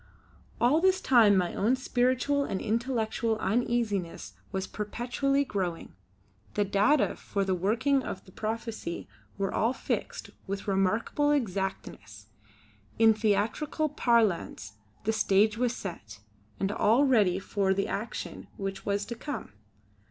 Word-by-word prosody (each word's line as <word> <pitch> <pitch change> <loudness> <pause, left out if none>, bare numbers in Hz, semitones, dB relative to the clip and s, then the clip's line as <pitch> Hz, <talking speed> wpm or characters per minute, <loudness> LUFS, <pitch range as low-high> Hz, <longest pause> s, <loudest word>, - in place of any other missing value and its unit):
All 270 +7 +4
this 375 0 +4
time 230 - +5
my 180 -2 0
own 230 +6 +2
spiritual 255 +2 +1
and 195 -8 -3
intellectual 225 -1 -1
uneasiness 215 -4 -1 0.2
was 190 -1 -2
perpetually 245 +7 -1
growing. 185 -8 -3 0.6
The 205 - +2
data 205 +9 +3
for 200 -1 -2
the 190 - +1
working 230 +10 +1
of 190 - -6
the 185 - -15
prophecy 220 -4 -4 0.3
were 195 -1 -1
all 230 +4 +2
fixed - - -4 0.2
with 195 +1 -4
remarkable 200 +9 +1
exactness. 190 - -3 0.7
In 225 -1 +6
theatrical 220 +9 0
parlance 225 - +1 0.3
'the 220 - +1
stage 210 0 +3
was 245 -1 +1
set' 110 - -7 0.4
and 195 - 0
all 230 +7 +3
ready 210 -9 +3
for 195 0 0
the 195 +1 +1
action 215 +4 -5
which 195 -1 -4
was 200 0 0
to 235 - -5
come. 255 - -6
215 Hz, 130 wpm, -29 LUFS, 195-245 Hz, 0.7 s, In